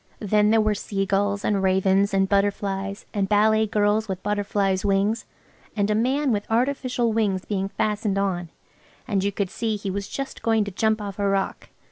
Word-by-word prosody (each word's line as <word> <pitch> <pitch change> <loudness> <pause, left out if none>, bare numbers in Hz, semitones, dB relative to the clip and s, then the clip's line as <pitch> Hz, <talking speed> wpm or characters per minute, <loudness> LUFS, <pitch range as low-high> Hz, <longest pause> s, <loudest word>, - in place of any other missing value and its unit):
Then 210 0 +2
there 225 +1 +4
were 215 0 +2
seagulls 200 0 -1
and 200 -2 +1
ravens, 190 +1 +2
and 195 -1 +2
butterflies, 200 0 -1
and 200 -3 -1
ballet 215 +1 +3
girls 210 +1 +1
with 190 -2 -5
butterflies' 200 -2 0
wings, 205 +3 +1 0.5
and 205 -1 +1
a - - +3
man 260 +5 +1
with 205 -2 -2
artificial 245 -1 0
wings 200 -4 0
being 195 -2 -2
fastened 210 -1 -1
on 180 -4 -1 0.6
and 200 -5 0
you 200 - +1
could 195 -1 -3
see 225 -2 -2
he 200 -1 -4
was 200 +1 -4
just 275 -1 -5
going 225 -2 +2
to 205 - -5
jump 220 +2 0
off 200 0 -7
a 200 - +1
rock. 195 -1 -2
205 Hz, 180 wpm, -24 LUFS, 195-215 Hz, 0.6 s, there